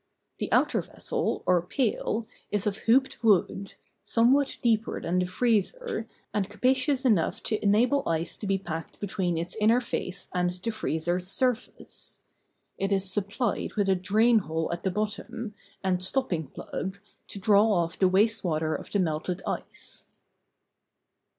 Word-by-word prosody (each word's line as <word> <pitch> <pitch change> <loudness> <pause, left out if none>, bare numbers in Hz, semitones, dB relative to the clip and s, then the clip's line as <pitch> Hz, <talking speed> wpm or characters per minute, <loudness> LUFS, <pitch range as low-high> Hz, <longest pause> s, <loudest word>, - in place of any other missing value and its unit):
The - - -3
outer - - +3
vessel, - - -3
or 180 -1 +4
pail, 220 +2 -1 0.2
is 205 -2 -1
of 210 0 -1
hooped 260 0 +3
wood, 200 -2 +2 0.3
somewhat 260 +5 +3
deeper 225 -2 +1
than 180 +2 0
the 180 - 0
freezer, 235 - 0 0.3
and 205 -2 0
capacious 260 +5 +1
enough 205 -10 +2
to 215 - 0
enable 235 +6 +3
ice 165 +1 -1
to 205 - -5
be 195 0 +2
packed 165 -4 -6
between 190 -4 -1
its 170 +1 -3
inner 225 +3 +5
face 195 -6 -4
and 180 0 +1
the 180 +6 -4
freezer's 175 -2 -1
surface. 250 +4 -2 0.6
It 195 +1 -1
is 195 -1 +3
supplied 205 +4 -1
with 205 -2 +1
a - - +5
drain 220 +5 +4
hole 160 -2 -2
at 170 - -5
the 190 - 0
bottom, 215 +3 -3 0.3
and 185 -1 +1
stopping 185 - -1
plug, 190 +8 -5 0.3
to - - -8
draw 205 +2 +4
off 170 -3 0
the 190 - +5
waste 205 +5 +2
water 160 -2 0
of - - -5
the - - 0
melted 175 +1 -1
ice. - - -6
200 Hz, 150 wpm, -27 LUFS, 180-230 Hz, 0.6 s, inner